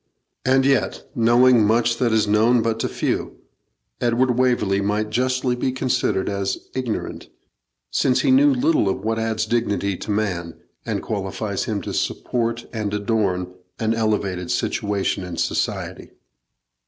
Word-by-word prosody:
And 130 +1 +3
yet, 135 -1 +1
knowing 120 +1 +5
much 115 +2 +2
that 120 -2 +2
is 110 -1 +2
known 110 +3 +3
but 115 0 -1
to - - -1
few, - - -2 0.6
Edward 120 +1 +2
Waverley 120 -6 +2
might 105 +2 -1
justly 130 0 0
be 125 +1 -1
considered 130 -6 0
as 100 -1 -1 0.2
ignorant, 125 -4 -4 0.6
since 130 -1 +2
he - - +2
knew 285 +2 +6
little 310 +5 +2
of - - -2
what 110 +1 0
adds 110 -1 -1
dignity 105 -4 0
to - - -8
man, 95 -6 -1 0.3
and - - -2
qualifies - - -3
him - - -3
to - - -5
support 115 -1 -2
and 105 -3 -2
adorn 100 -4 -1 0.2
an 110 0 0
elevated 100 -5 -1
situation 100 -1 -1
in 90 -2 -6
society. - - -2
115 Hz, 140 wpm, -22 LUFS, 105-125 Hz, 0.6 s, knew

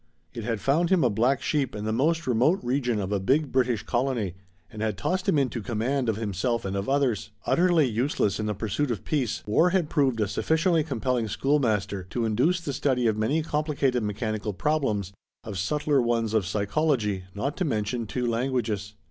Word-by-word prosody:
It 115 - -6
had 115 -1 -2
found 160 - +2
him 185 -4 +4
a 125 - +3
black 120 +6 +1
sheep 145 -4 0
in 105 0 -4
the 110 - 0
most 160 +7 +1
remote 130 +9 +3
region 125 -3 0
of 95 0 -3
a 100 - +1
big 135 +9 +1
British 125 -4 +1
colony 120 -7 -1 0.4
and 110 - -7
had 110 -3 -1
tossed 185 - -1
him 160 - +3
into 125 -4 0
command 120 +3 -1
of 110 - +1
himself 110 +2 -1
and 95 0 -2
of 100 +5 -2
others. 125 -8 +1 0.2
Utterly 175 -3 +3
useless 115 -3 0
in 105 - -1
the 105 - -1
pursuit 110 +8 -1
of 115 - -3
peace, 135 -8 -1
war 160 +12 +3
had 175 -4 0
proved 130 -5 +2
a 105 - +1
sufficiently 160 - +1
compelling 125 -5 -1
schoolmaster 105 -6 0
to 120 +2 -1
induce 130 +12 +2
the 145 -4 -4
study 130 -2 +1
of 110 -2 +3
many 135 +9 0
complicated 145 -5 0
mechanical 105 0 -2
problems, 110 -7 -1 0.3
of 100 -4 -5
subtler 145 +6 +1
ones 115 -2 0
of 105 -5 +1
psychology, 105 -1 0
not 135 +8 -2
to 185 - 0
mention 115 - -1
two 125 +3 -2
languages. 115 -4 -1
120 Hz, 190 wpm, -26 LUFS, 105-145 Hz, 0.4 s, him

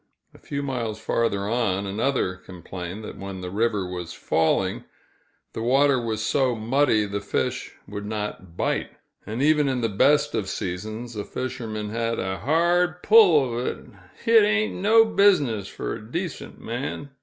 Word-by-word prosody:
A - - -17
few 140 0 -4
miles 115 -6 -3
farther 110 -3 0
on, 105 -4 0
another 105 0 0
complained 90 +2 -8
that - - -8
when 95 -1 -6
the 90 0 -5
river 105 -2 0
was 90 -2 -6
falling, 80 0 0 0.7
the - - -4
water 135 +2 +3
was 110 -2 -2
so 130 -2 +2
muddy 115 0 +2
the 100 0 -4
fish 100 - -2
would 100 0 -6
not 105 -5 -5
bite; - - -1 0.4
and 115 +5 -2
even 150 -1 +4
in 130 -2 -1
the 115 - +1
best 140 +9 +3
of 95 -3 -2
seasons, 110 +6 -5
a 105 - -3
fisherman 110 -4 -5
had 115 0 -1
"a 95 -1 -3
hard 175 - +2
pull 185 - +6
uv 120 +1 -2
it; - - -5 0.4
hit 230 -1 +7
ain't 215 +1 +2
no 220 +4 +5
business 150 - +3
fer - - -5
a - - -12
decent 170 -1 -5
man!" 135 +4 -5
115 Hz, 160 wpm, -24 LUFS, 100-140 Hz, 0.7 s, hit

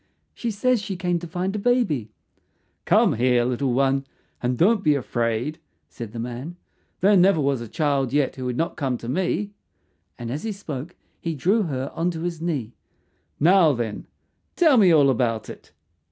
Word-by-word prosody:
She 235 - -4
says 230 +2 +1
she 200 -2 -4
came 175 -1 -1
to 175 - -8
find 180 +4 -3
a - - -1
baby." 200 - +1 0.8
"Come - - +4
here, 120 +1 +2
little 125 +1 0
one, 135 +2 +1 0.3
and 125 0 -1
don't 200 - +3
be 150 -2 +4
afraid," 120 +3 -2 0.3
said 115 -4 -8
the 115 - -8
man. 125 +8 -5 0.5
"There 200 +3 +5
never 185 -2 +5
was 140 -3 0
a 120 - -6
child 140 0 0
yet 145 -1 +1
who 130 - -6
would 125 -1 -2
not 165 +2 -2
come 130 -4 -1
to 115 - -9
me," 190 +8 -1 0.7
and 120 -1 -6
as 145 +4 -3
he 220 - -3
spoke 165 -5 -7 0.2
he 165 -1 -3
drew 195 - +2
her 135 -1 -3
on 170 +2 0
to 165 -2 -5
his 170 -2 -4
knee. 140 -9 -3 0.7
"Now, 170 -1 +5
then, 115 -4 -4 0.5
tell 315 -7 +5
me 195 -6 +6
all 145 -4 +5
about 115 -3 -1
it." - - -14
150 Hz, 180 wpm, -23 LUFS, 125-180 Hz, 0.8 s, me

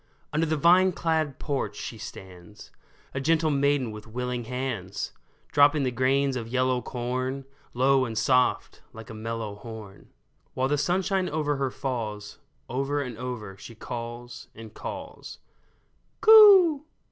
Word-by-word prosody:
Under 160 +2 +1
the 155 0 0
vine 180 +4 +5
clad 160 -5 -1
porch 135 -9 -3
she 115 - -7
stands, 95 +1 -11 0.4
A 135 - -3
gentle 160 +2 +2
maiden 140 -3 +1
with 105 +1 -10
willing 125 +1 -4
hands, 115 -6 -4 0.4
Dropping 145 0 +4
the 130 - 0
grains 135 +2 +1
of 115 -3 -4
yellow 130 +1 0
corn. 130 +3 -3 0.3
Low 130 +1 +3
and 115 -2 -5
soft, 125 +3 +1
like 110 0 -10
a - - -8
mellow 110 -1 -5
horn, 105 -2 -11 0.5
While 130 +1 0
the 145 - +1
sunshine 185 +4 0
over 150 -1 -1
her 135 -1 -1
falls, 110 -6 -5 0.3
Over 135 +3 -1
and 125 -5 -4
over 120 -6 -6
she 115 +3 -11
calls 120 +1 -7
and 110 -1 -11
calls - - -8 0.4
'' - - -43
Coo 395 -9 +8
130 Hz, 145 wpm, -26 LUFS, 115-145 Hz, 0.5 s, Coo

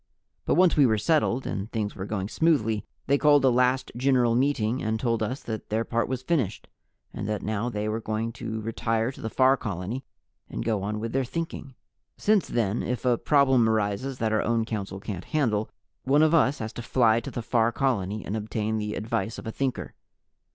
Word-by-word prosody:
But - - +2
once 180 +1 +5
we 145 -3 +5
were 110 -2 +2
settled 140 -2 +1
and 100 +3 -4
things 105 -3 -2
were 95 +1 -5
going 100 -3 -2
smoothly, 115 -6 +1 0.2
they 140 +1 +2
called 145 -2 +5
a 130 - +5
last 125 +1 +2
General 125 -2 +3
Meeting 125 -2 +1
and 110 0 -1
told 115 -1 0
us 125 +6 -3
that 110 -2 -6
their 110 +2 0
part 115 0 0
was 130 -1 -3
finished, 135 - -1 0.5
and 105 - -4
that 105 -2 -2
now 110 +3 -1
they 105 -2 -3
were 110 +1 -2
going 110 +1 -2
to 110 -1 -5
retire 115 +1 -1
to - - -13
the 110 - -3
Far 130 +3 +4
Colony 100 +6 -4 0.5
and - - -5
go 110 -3 0
on 105 +2 -3
with 115 +1 -4
their 135 0 +1
Thinking. 135 -1 -5 0.4
Since 210 -3 +2
then, 115 -2 0
if 125 +1 -3
a 125 -1 +4
problem 130 -3 +3
arises 110 +5 -1
that 110 -2 0
our 110 - +2
own 115 0 +1
Council 100 -4 -4
can't 95 -3 -6
handle, 110 -8 0 0.3
one 145 +4 +4
of 155 +1 +3
us 145 -3 +4
has 110 -1 -5
to - - -6
fly 115 -1 +3
to 115 - -7
the 120 - -5
Far 115 0 +2
Colony 110 -6 -1
and 105 - -3
obtain 110 0 -2
the 105 0 -3
advice 110 0 -2
of - - -8
a 110 - -3
Thinker. 130 +1 -3
115 Hz, 205 wpm, -26 LUFS, 110-130 Hz, 0.5 s, once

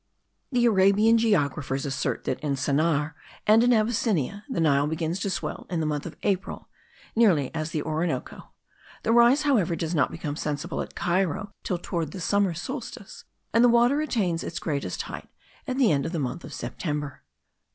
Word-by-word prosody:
The 245 -2 +3
Arabian 210 +2 +5
geographers 145 - 0
assert 140 -1 -2
that 130 - -2
in 145 -2 -1
Sennaar 150 +3 +1 0.3
and 220 +2 +6
in 245 - +4
Abyssinia 215 - +1
the 260 - -2
Nile 145 -3 +3
begins 160 +3 -2
to 200 - -2
swell 185 - -4
in 175 - -1
the 160 - 0
month 150 -1 -2
of - - -10
April 195 -1 -2 0.5
(nearly 185 - +3
as 155 0 -3
the 155 -3 -2
Orinoco); 155 -3 -3 0.5
the 225 - +1
rise, 240 +5 +5
however, 215 - +2
does 165 +1 -3
not 145 -5 +2
become 150 -3 -5
sensible 150 -1 -3
at - - -8
Cairo 185 +2 0
till 180 - -2
toward 170 -3 -3
the 195 - -6
summer 195 0 +1
solstice; 230 - -7 0.3
and 230 +2 +5
the 245 - +7
water 240 +5 +4
attains 195 - 0
its 170 - -5
greatest 145 -5 -3
height - - -8 0.4
at 255 -1 -2
the 255 -6 +4
end 140 -2 +1
of 165 - -6
the - - -1
month 130 +1 -3
of - - -9
September. 150 -4 -4
175 Hz, 180 wpm, -26 LUFS, 150-220 Hz, 0.5 s, the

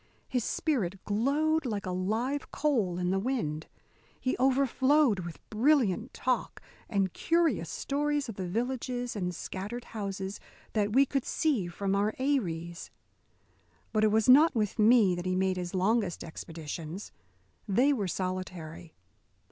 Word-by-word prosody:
His 250 -3 -1
spirit 210 - -1
glowed 290 +9 +1
like 215 -6 -3
a 185 - -2
live 220 +10 -1
coal 225 -13 0
in 180 0 0
the 195 - +1
wind. 195 - -2 0.5
He 255 - 0
overflowed 265 -2 +3
with 170 -2 -6
brilliant 235 - +2
talk 255 0 -1 0.3
and 195 -3 0
curious 325 - +1
stories 290 0 -1
of 225 - -5
the 190 -2 -4
villages 245 +3 -2
and 180 -3 -2
scattered 205 +9 -5
houses 195 -2 -5 0.3
that 210 -1 +1
we 275 +3 +6
could 275 -1 -1
see 265 - 0
from 195 +3 -2
our 205 +2 +1
eyries. 170 - -2 1.0
But 215 - +2
it 215 - +4
was 220 0 +2
not 285 +4 +7
with 215 -1 -1
me 215 -3 +6
that 175 +1 -4
he 185 - +1
made 190 0 +1
his 180 0 -4
longest 195 -1 +1
expeditions. 160 +2 -7 0.6
They 250 +9 +4
were 210 -8 -1
solitary. 180 -3 -5
215 Hz, 140 wpm, -30 LUFS, 185-260 Hz, 1.0 s, not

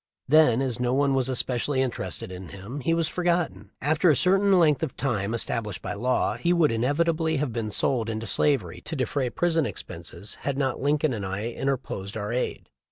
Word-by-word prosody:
Then, 135 -4 +5
as 125 -3 -2
no 125 +1 +1
one 140 0 +2
was 135 -1 +1
especially 130 +2 0
interested 120 -6 -4
in 90 -2 -8
him, 100 - -7
he 140 +5 -1
was 165 -1 +1
forgotten. 175 - -1
After 155 +4 +3
a 150 - +5
certain 195 +4 +4
length 155 -6 +4
of 160 -5 -3
time 110 -7 -1
established 115 -3 -2
by - - -3
law, 125 +5 0
he 175 0 +1
would 170 -6 +3
inevitably 160 +7 +1
have 135 -4 -2
been 115 -2 -2
sold 115 +2 +1
into 110 0 -3
slavery 115 - +2
to 160 - -4
defray 130 0 -1
prison 165 0 +1
expenses 100 0 -6
had 140 -1 -2
not 135 -3 -1
Lincoln 145 0 +1
and 105 -3 -4
I 95 +4 -3
interposed 115 -7 -3
our 105 +1 -3
aid. 125 - -2
130 Hz, 190 wpm, -26 LUFS, 115-155 Hz, -, Then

